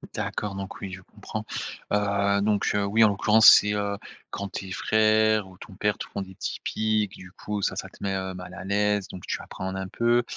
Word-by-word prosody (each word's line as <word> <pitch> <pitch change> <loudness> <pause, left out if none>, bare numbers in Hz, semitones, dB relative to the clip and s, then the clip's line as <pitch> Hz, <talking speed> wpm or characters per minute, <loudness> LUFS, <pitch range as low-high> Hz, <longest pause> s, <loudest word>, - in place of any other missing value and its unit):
D'accord, 100 -2 -3
donc 95 0 -6
oui 95 -2 -6
je 95 - -8
comprends. - - -7 0.5
Heu, 100 -1 +2
donc 105 -1 +1
heu, 100 -1 +1
oui 110 +3 +4
en 105 - +7
l'occurrence 105 +2 +5
c'est, 105 0 +6
heu, 100 -1 -1 0.3
quand 100 - -4
tes 95 -1 -6
frères 110 0 +3
ou 90 - -16
ton 95 - -12
père 105 +1 0
te - - -5
font 100 - -5
des 95 -1 -9
petits 95 - -5
piques, 110 -2 0
du 90 0 -12
coup 105 -1 -4
ça - - 0
ça - - -5
te - - -20
met 95 -1 -1 0.2
mal, 90 0 -9
heu, - - -9
à 90 - -7
l'aise, 105 0 +1
donc 90 - -9
tu - - -2
appréhendes 95 0 -6
un 95 0 -4
peu 120 +2 +2
100 Hz, 225 wpm, -26 LUFS, 95-105 Hz, 0.5 s, en